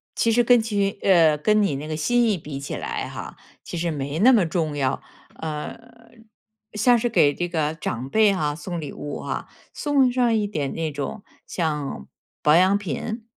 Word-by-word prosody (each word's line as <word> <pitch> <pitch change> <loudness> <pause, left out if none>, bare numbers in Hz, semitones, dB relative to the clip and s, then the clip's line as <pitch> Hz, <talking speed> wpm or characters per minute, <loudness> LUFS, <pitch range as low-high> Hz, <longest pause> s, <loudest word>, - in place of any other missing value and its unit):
其 230 - +2
实 240 +1 +4
跟 245 -1 +5
据 200 -3 -1
呃， 165 -5 +5
跟 210 +7 +2
你 160 -8 0
那 150 +2 -6
个 155 - -3
心 240 +8 +2
意 200 - +1
比 145 -3 -7
起 140 - -5
来 - - -4
哈， - - -8 0.3
其 175 - -6
实 170 +1 -1
没 145 +2 -3
那 250 +6 +7
么 200 -7 +4
重 160 -2 -1
要， 135 -2 0 0.3
呃， 150 -2 -5 1.0
像 240 +3 +4
是 240 - 0
给 145 -10 +4
这 175 +3 -2
个 155 -2 -1
长 130 -4 -4
辈 215 +1 +4
哈， 150 -5 -1
送 175 +1 -5
礼 145 - -6
物 145 - -6
啊， - - -4 0.3
送 275 -4 +2
上 245 -2 +2
一 215 -2 +1
点 150 -9 -3
那 165 -1 -2
种 145 +9 -5 0.2
像 150 - -3 0.4
保 150 +1 +5
养 185 +3 +5
品 205 - -5
175 Hz, 200 characters per minute, -23 LUFS, 150-220 Hz, 1.0 s, 那